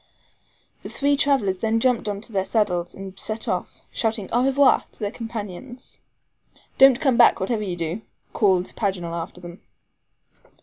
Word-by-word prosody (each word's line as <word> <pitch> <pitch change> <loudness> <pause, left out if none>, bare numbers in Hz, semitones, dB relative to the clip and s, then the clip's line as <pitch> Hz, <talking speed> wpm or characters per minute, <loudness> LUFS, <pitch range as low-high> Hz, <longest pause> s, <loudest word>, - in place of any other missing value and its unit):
The - - -8
three 285 +1 +1
travelers 265 -10 +1
then 225 +2 +1
jumped 245 -2 +1
into 205 +3 -5
their 195 -3 0
saddles, 180 -5 -1
and 195 0 -9
set 220 0 -3
off, 180 - -3
shouting 220 -3 -2
"Au 240 +2 +2
revoir!" 270 +1 +4
to - - -18
their 205 -2 -2
companions. 230 +2 -7 0.8
"Don't 270 -2 +7
come 265 -5 +2
back - - +6
whatever 215 +3 -1
you 190 -4 -3
do," 170 +4 -3 0.3
called 190 -4 +1
Paganel 185 -5 -2
after 170 +1 -6
them. 175 0 -11
210 Hz, 150 wpm, -23 LUFS, 185-240 Hz, 0.8 s, Don't